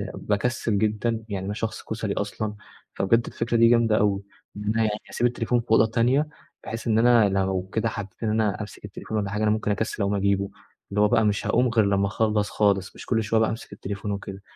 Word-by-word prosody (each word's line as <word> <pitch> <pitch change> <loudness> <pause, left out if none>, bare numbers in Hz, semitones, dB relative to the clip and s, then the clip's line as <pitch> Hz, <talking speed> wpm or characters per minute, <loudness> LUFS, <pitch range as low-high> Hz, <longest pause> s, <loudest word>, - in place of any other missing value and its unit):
باكسل 110 0 -1
جدًا، 110 +2 0
يعني 95 -2 -3
أنا 100 - -2
شخص 110 +1 -4
كُسلي 110 -2 -3
أصلًا، 105 +1 -3 0.4
فبجد 115 +5 +2
الفكرة 115 0 -1
دي 115 0 +6
جامدة 115 -2 +4
أوي، 100 -2 +1 0.3
إن 105 - -5
أنا 110 +2 0
يعني 110 - +2 0.2
أسيب 120 - +1
التليفون 120 0 0
في 115 -1 -8
أوضة 110 0 +6
تانية، 125 +6 +2 0.4
بحيث 115 +1 -6
إن 110 0 +3
أنا 115 -3 +5
لو 95 -1 -1
كده 115 0 +1
حبّيت 100 0 -7
إن 110 - +1
أنا 110 -2 0
أمسك 105 0 -8
التليفون 105 +2 -5
والّا 100 -2 -1
حاجة، 105 +1 -1
أنا 105 - +3
ممكن 110 -1 0
أكسّل 110 +1 -2
أقوم 100 +1 +1
أجيبه، 100 0 +1 0.4
اللي 105 +1 0
هو 105 - +6
بقى 110 -1 +3
مش 105 -1 0
هاقوم 125 - +3
غير 115 -2 +3
لمّا 100 0 +2
أخلّص 105 0 0
خالص، 100 -2 +1
مش - - -10
كل 115 -2 +1
شوية 110 +1 +1
بقى 110 - +3
أمسك 110 - -6
التليفون 100 +1 -5
وكده. 100 -1 -6
105 Hz, 220 wpm, -25 LUFS, 100-115 Hz, 0.4 s, دي